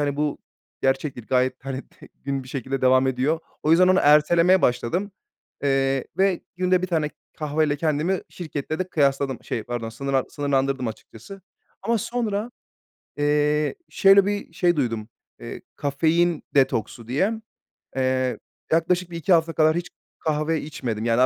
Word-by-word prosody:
hani, 145 -1 0
"Bu 150 -1 -1 0.4
gerçektir." 135 -3 -1
gayet, 130 +1 0
hani, 135 0 -4
t - - -17
gün 140 -1 -4
bir 130 - -13
şekilde 135 0 -3
devam 130 +1 +5
ediyor. 130 +5 +1 0.2
O 155 - +1
yüzden 180 +3 +6
onu 185 0 +5
ertelemeye 170 +5 +5
başladım. 175 - 0 0.5
Eee, 135 -1 +1
ve 190 -2 +2 0.2
günde 185 0 +2
1 - - 0
tane 160 -4 0 0.3
kahveyle 150 -1 0
kendimi 160 +4 0
şirkette 155 -2 -5
de 185 - -2
kıyasladım, 140 -4 0
şey, 115 - -3
pardon, 120 -1 -4
sınırla 135 +3 -1
sınırlandırdım 135 -3 0
açıkçası. 115 - -10 0.4
Ama 230 0 +1
sonra, 220 0 -2 0.7
eee, 150 +1 +1
şöyle 195 0 +6
bir 205 -4 -3
şey 175 +1 +2
duydum, 115 -6 -2 0.3
eee, - - -8
"kafein 160 +4 +1
detoksu" 115 -4 +1
diye. 170 - +1 0.6
Eee, 130 -1 0 0.3
yaklaşık 175 +2 +2
1-2 170 +3 0
hafta 165 -1 +3
kadar 155 0 +3
hiç 175 +1 -3 0.3
kahve 155 +1 0
içmedim. 120 -7 -4
Yani, 115 +1 +2
150 Hz, 145 wpm, -24 LUFS, 135-175 Hz, 0.7 s, yüzden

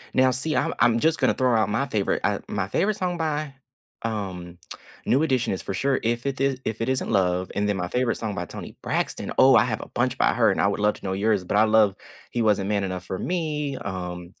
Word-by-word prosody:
Now 130 0 +5
see, 140 +5 0
I'm - - +1
I'm 115 0 +4
just 160 +5 +2
gonna - - +3
throw 125 -2 +2
out 110 -2 +2
my 115 +7 0
favorite, 105 -6 0
uh, - - +1
my 100 -2 -2
favorite 200 - +1
song 180 -3 -2
by, 155 -3 -2 0.5
um, 95 -6 -5 0.5
New 135 +5 +3
Edition 130 -9 +1
is 95 - -4
for - - -4
sure, 135 +7 +1
"If 120 +2 -1
It 135 -1 -3
Is 135 -1 0
If 110 0 -3
It 115 - -1
Isn't 130 0 -1
Love," 90 -1 +1
and 105 0 0
then 105 -1 0
my 90 -1 -2
favorite 125 +4 0
song 110 -3 -4
by 90 - -3
Toni - - -9
Braxton, - - -2
oh, 130 0 +7
I - - +6
have 110 -3 -2
a - - -9
bunch 125 +1 -1
by - - +3
her, 115 -3 +4
and - - 0
I - - +3
would 100 - -1
love 105 0 +3
to - - -12
know 95 - -1
yours, 100 0 +1
but 95 +3 -1
I 105 - +6
love, 110 -3 +4 0.3
"He 120 - -1
Wasn't 100 -2 +2
Man 100 -1 +1
Enough 95 -1 -4
For 95 - -4
Me," 150 - -2
um, 90 -2 -6
110 Hz, 250 wpm, -24 LUFS, 95-130 Hz, 0.5 s, oh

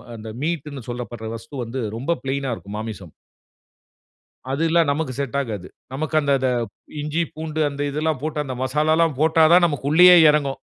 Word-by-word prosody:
அந்த 110 0 -8
மீட்ன்னு 150 -4 -3
சொல்லப்படுற 120 -2 -6
வஸ்து 115 +6 -12
வந்து 120 +3 -5 0.2
ரொம்ப 135 +8 -2
ப்ளைனா 135 0 -2
இருக்கும். 100 0 -9
மாமிசம். 105 -6 -7 1.4
அது 140 +4 -1
எல்லா 170 +1 +4
நமக்கு 140 -2 -1
செட் 140 0 -3
ஆகாது. 105 -8 -5 0.3
நமக்கு 155 +4 -4
அந்த 140 -1 +1
அத 130 - 0 0.5
இஞ்சி, 150 +3 -1
பூண்டு 155 0 -4
அந்த 140 0 -8
இதெல்லாம் 150 -1 -1
போட்டு 155 -1 -3
அந்த 130 -2 -5
மசாலாலாம் 155 +2 +2
போட்டாதான் 160 +2 +5
நமக்கு 145 -3 -3
உள்ளேயே 180 +3 +8
இறங்கும். 140 -3 0
140 Hz, 155 wpm, -22 LUFS, 130-155 Hz, 1.4 s, உள்ளேயே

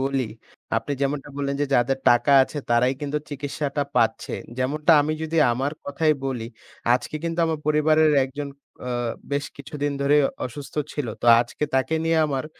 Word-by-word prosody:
বলি, 135 -3 0 0.5
আপনি - - -2
যেমনটা 140 +1 -1
বললেন 140 -1 -1
যে 145 - +2
যাদের 130 +2 +2
টাকা 120 +4 +4
আছে 145 - -4
তারাই 125 +3 +3
কিন্তু 145 0 -2
চিকিৎসাটা 145 0 -3
পাচ্ছে। 110 -1 +1 0.2
যেমনটা 150 +5 +2
আমি 150 +2 0
যদি 160 +1 -3 0.2
আমার 135 +4 -1
কথাই 155 +2 +1
বলি, 125 -4 -3 0.5
আজকে 130 - -3
কিন্তু 165 0 -3
আমার 160 -1 -1
পরিবারের 155 0 +4
একজন 140 +2 -6 0.4
আ - - -3 0.4
বেশ 140 0 0
কিছুদিন 145 +1 -4
ধরে 140 +1 +4 0.3
অসুস্থ 140 +3 -10 0.2
ছিলো। 140 -6 -3
তো - - -1
আজকে 120 +5 -3
তাকে 130 +4 +1
নিয়ে 165 0 +2
আমার 135 -2 -2
140 Hz, 160 wpm, -24 LUFS, 130-150 Hz, 0.5 s, টাকা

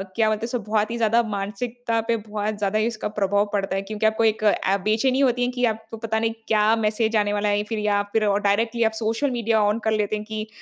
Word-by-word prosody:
क्या 220 -1 +3
मतलब 215 0 -2
इसको 240 +1 -2
बहुत 215 0 +1
ही 235 - -3
ज़्यादा 230 +1 +3
मानसिकता 225 +3 -3
पे 235 - +2
बहुत 210 0 -4
ज़्यादा 205 +1 0
ही 215 - +1
इसका 230 -2 -3
प्रभाव 205 +1 +2
पड़ता 195 -1 -1
है। 195 - 0
क्योंकि 215 +2 -3
आपको 220 +1 +2
एक 220 -1 +1
ऐ 200 -2 +2
बेचैनी 225 +6 +2
होती 250 -3 +2
है 250 - -1
कि 250 0 0
आपको 225 0 -3
पता 220 0 -2
नहीं 225 0 0
क्या 215 0 +3
मैसेज 220 0 0
आने 205 -1 +2
वाला 210 0 0
है 205 0 +1
फिर 225 -2 -2
या 205 -1 +1
फिर 220 -1 +2 0.2
डायरेक्टली 225 +4 +1
आप 220 - +2
सोशल 225 +5 0
मीडिया 230 -2 +1
ऑन 210 +2 +2
कर 220 - +1
लेते 215 -1 0
हैं 210 - -5
कि 215 0 -5
220 Hz, 245 wpm, -23 LUFS, 210-230 Hz, 0.2 s, क्या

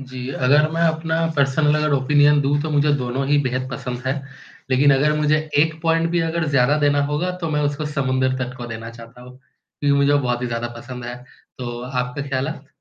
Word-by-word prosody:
जी, 130 -1 -7
अगर 145 +4 +3
मैं 165 +1 -2
अपना 160 0 -1 0.2
पर्सनल 145 +2 +2
अगर 150 -1 0
ओपिनियन 145 +2 +4
दूँ 145 +1 +1
तो 155 - -3
मुझे 145 0 +2
दोनों 130 +1 -2
ही 145 +1 +3
बेहद 130 0 -2
पसंद 125 -1 -5
हैं। 130 - +1 0.6
लेकिन 140 +2 +4
अगर 150 +3 +2
मुझे 150 0 +2 0.2
1 160 +1 +2
पॉइंट 165 0 +2
भी 175 0 +1
अगर 165 0 -1
ज़्यादा 140 +1 +3
देना 145 -1 +2
होगा 150 +5 -1
तो 165 - -2
मैं 150 -1 0
उसको 145 +1 -4
समुद्र 130 -3 0
तट 125 -1 -4
को 120 -2 -7
देना 115 0 -7
चाहता 115 +1 -13
हूँ 125 +1 -13
क्योंकि 140 +2 -3
मुझे 140 0 +3
वो 145 - +4
बहुत 125 -2 -1
ही - - -1
ज़्यादा 120 0 -3
पसंद 125 +1 -8
है। 120 +1 -6 0.4
तो 120 -1 -5
आपका 125 +2 -3
ख़्यालात? 135 +2 -3
140 Hz, 210 wpm, -21 LUFS, 125-150 Hz, 0.6 s, ओपिनियन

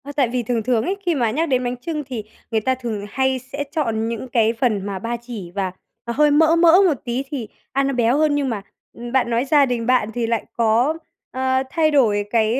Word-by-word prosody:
Ờ, 285 - -7
tại 275 -4 +3
vì 245 0 -1
thường 230 -1 -1
thường 235 -1 +1
ấy, 380 +8 -2
khi 345 -2 +2
mà 235 -5 +1
nhắc 320 +7 -1
đến 255 -1 +1
bánh 245 0 -2
chưng 300 +4 -4
thì 250 -5 -5 0.3
người 220 -1 +1
ta 260 +4 +1
thường 230 -5 -5
hay 265 +2 0
sẽ 260 +3 -5
chọn 225 -8 -1
những 230 +2 -4
cái 225 -2 +2
phần 225 -5 0
mà 195 -2 -4
ba 230 +4 -3
chỉ 225 -8 -8
và 190 0 -2 0.3
nó 235 - -3
hơi 295 +3 +4
mỡ 320 +2 +5
mỡ 335 0 +6 0.2
một 330 - +3
tí 245 +2 -2
thì 265 -7 -4 0.2
ăn 275 0 +1
nó 275 - -1
béo 245 +1 +2
hơn, 305 -1 +2
nhưng 280 -2 0
mà, 220 -4 -3 0.3
ừm, 240 0 -8
bạn 260 -2 +2
nói 235 +2 +1
gia 285 0 +4
đình 245 -3 -2
bạn 245 -3 +2
thì 235 0 -1
lại 230 -1 -1
có, 235 +5 +2 0.4
ờ, 260 0 0
thay 310 +1 +2
đổi 215 -8 +3
cái, 225 +2 +2
245 Hz, 250 wpm, -21 LUFS, 225-275 Hz, 0.4 s, mỡ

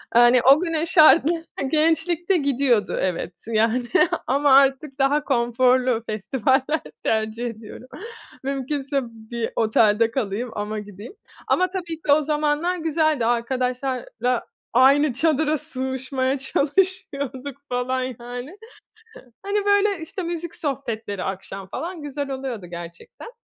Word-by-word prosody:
Eee, 240 - +8
hani, 240 +1 +6
o 270 +5 +6
günün 330 -2 -1
şartları 330 0 +5 0.2
gençlikte 325 +4 +1
gidiyordu. 270 - +1
Evet, 180 -1 -2
yani, 225 +2 +2 0.5
ama 275 +1 +4
artık 275 +1 +3
daha 285 +2 +2
konforlu 250 -1 +2
festivaller 260 +8 0 0.2
tercih 220 +2 -1
ediyorum. 230 +2 -8 0.6
Mümkünse 275 +1 -2
bir 230 0 -6
otelde 220 0 +3
kalayım 230 -1 -2
ama 210 +1 -3
gideyim. 205 - -10 0.3
Ama 370 0 +2
tabii 340 -3 -5
ki 295 - 0
o 295 +2 +5
zamanlar 300 +4 0
güzeldi. 315 -5 +1
Arkadaşlarla 250 0 -1 0.3
aynı 275 +3 +5
çadıra 310 +2 +1
sığışmaya 260 0 -3
çalışıyorduk 280 -3 -1
falan 250 +1 -1 0.2
yani. 245 +7 -7 0.9
Hani, 405 +1 -1
böyle, 405 -1 +3
işte, 340 +4 -5
müzik 340 -1 -5
sohbetleri 230 - -4
akşam 195 0 -6
falan 335 - -6
güzel 285 -1 -4
oluyordu 260 -7 -5
gerçekten. 170 - -10
265 Hz, 115 wpm, -23 LUFS, 235-305 Hz, 0.9 s, Eee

